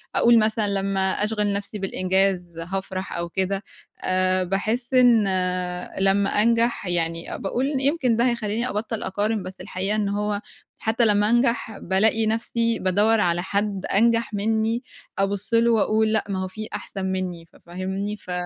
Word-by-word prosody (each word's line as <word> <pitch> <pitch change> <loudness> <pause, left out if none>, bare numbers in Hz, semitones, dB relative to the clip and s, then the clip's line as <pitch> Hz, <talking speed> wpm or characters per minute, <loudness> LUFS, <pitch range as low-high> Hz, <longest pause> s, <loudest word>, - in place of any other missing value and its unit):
أقول 235 -1 +6
مثلًا 215 0 +2
لمّا 195 -1 0
أشغِل 210 0 0
نفْسي 205 +1 -4
بالإنجاز 185 -2 0
هافرح 190 +2 -4
أو 170 0 -3
كده 190 +2 -1 0.4
آآ، 185 0 +1
باحس 215 +7 -2
إن 245 -3 +6 0.8
لمّا 195 +1 +3
أنجح 230 -1 +2
يعني 165 -1 -2
باقول 240 +6 -2 0.2
يمكن 275 -4 +2
ده 235 +2 +2
هيخلّيني 235 +1 -2
أبطّل 220 +1 -3
أقارن، 205 +2 -1
بس 185 +1 -8
الحقيقة 195 +3 -2
إن 210 -2 0
هو 205 0 -1 0.4
حتّى 225 +1 +1
لمّا 210 -1 +3
انجح 235 -3 +1
بالاقي 220 +4 +2
نفْسي 230 +1 0
بادوّر 205 +4 +2
على 175 -1 +1
حد 200 0 -2
أنجح 230 +1 +2
مني، 220 +3 0 0.3
أبُصّ 195 +2 -1
له 230 +1 +4
واقول 220 0 +2
لأ 220 - +2
ما 190 -1 -2
هو - - -3
في 215 +3 -7
أحسن 200 -2 -4
مني، 185 -3 -3
ف - - -28
فاهمني؟ 190 +4 -4
ف 185 - -10
205 Hz, 155 wpm, -23 LUFS, 190-225 Hz, 0.8 s, أقول